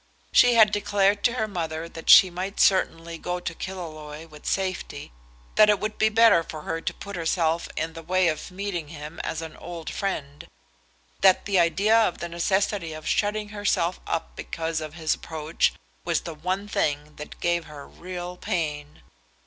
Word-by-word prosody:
She 245 -1 +6
had 220 -2 +7
declared 205 -1 +2
to 240 - +4
her 220 -3 -1
mother 165 -4 -4
that 165 -1 -8
she 185 - +9
might 185 +3 -5
certainly 165 -3 +2
go 180 +2 -3
to 175 -1 -4
Killaloe 155 -4 -7
with 150 -2 -13
safety, 190 - -3 0.5
that 210 - +7
it 205 -2 +4
would 215 0 -4
be 220 - +4
better 225 -5 +6
for 155 -2 -8
her 165 - -3
to - - -2
put 200 0 -8
herself 165 -1 0
in 160 +1 -2
the 165 - -8
way 185 +2 +2
of 155 -2 -2
meeting 180 -4 -4
him 150 0 -9
as 165 0 -3
an 160 -1 -8
old 170 -2 -7
friend, 145 -8 -4 0.7
that 190 -1 +5
the 200 -2 +2
idea 180 +6 +3
of 225 -6 +3
the 170 - -5
necessity 190 0 0
of 155 0 -8
shutting 210 0 0
herself 200 -4 0
up 165 - -3
because 165 -1 -3
of 155 0 -7
his 160 -2 0
approach, 160 0 -1 0.3
was 170 -2 0
the 165 - -6
one 185 +6 -3
thing 150 -6 -1
that 150 - -9
gave 175 -1 0
her 150 -2 -10
real 180 0 -7
pain. 150 - -3
170 Hz, 180 wpm, -25 LUFS, 160-195 Hz, 0.7 s, she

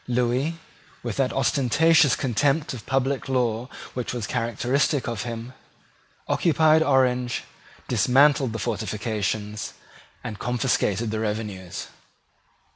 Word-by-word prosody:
Lewis, 125 +6 0 0.5
with - - -3
that - - +1
ostentatious 150 +3 +3
contempt 140 +4 0
of 120 -4 -9
public 135 0 0
law 125 -1 0 0.2
which 125 -1 -3
was 120 -4 -3
characteristic 125 +6 0
of 115 -4 -3
him, 115 +2 -6 0.7
occupied 160 -1 +4
Orange, 125 -4 +2 0.4
dismantled 135 0 +4
the 115 - -4
fortifications, 105 0 -3 0.5
and 110 -4 -6
confiscated 120 -3 0
the 110 - -2
revenues. 105 -4 -4
125 Hz, 105 wpm, -24 LUFS, 110-135 Hz, 0.7 s, occupied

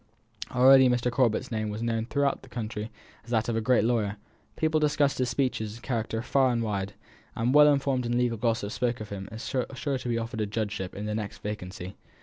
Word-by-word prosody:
Already 130 +1 +7
Mr. 125 0 +1
Corbet's 120 -3 +1
name 110 -1 -1
was 105 +2 -4
known 115 -1 -1
through 140 +2 +1
the 130 - -15
country 110 -2 -4 0.3
as 115 - -17
that 110 -2 +1
of 120 - -1
a 115 - +1
great 120 -1 +3
lawyer; 110 -3 0 0.4
people 155 0 +1
discussed 145 -2 +2
his 125 -1 +1
speeches 120 -4 -1
and 115 - -14
character 115 -1 -2
far 130 0 +3
and 115 -1 0
wide; 100 -2 -2 0.4
and 120 +3 +1
the - - +6
well 150 0 +8
informed 135 -3 0
in 120 0 0
legal 120 -3 0
gossip 110 -3 0
spoke 125 0 -1
of 105 -1 -7
him 95 -1 -6
as 110 +1 -7
sure 135 +2 -2
to 125 - -5
be 115 - +1
offered 115 0 -3
a 105 - 0
judgeship 105 -3 -3
at 105 - -5
the 105 - -2
next 105 -1 -4
vacancy. 95 -2 -5
115 Hz, 220 wpm, -28 LUFS, 110-125 Hz, 0.4 s, well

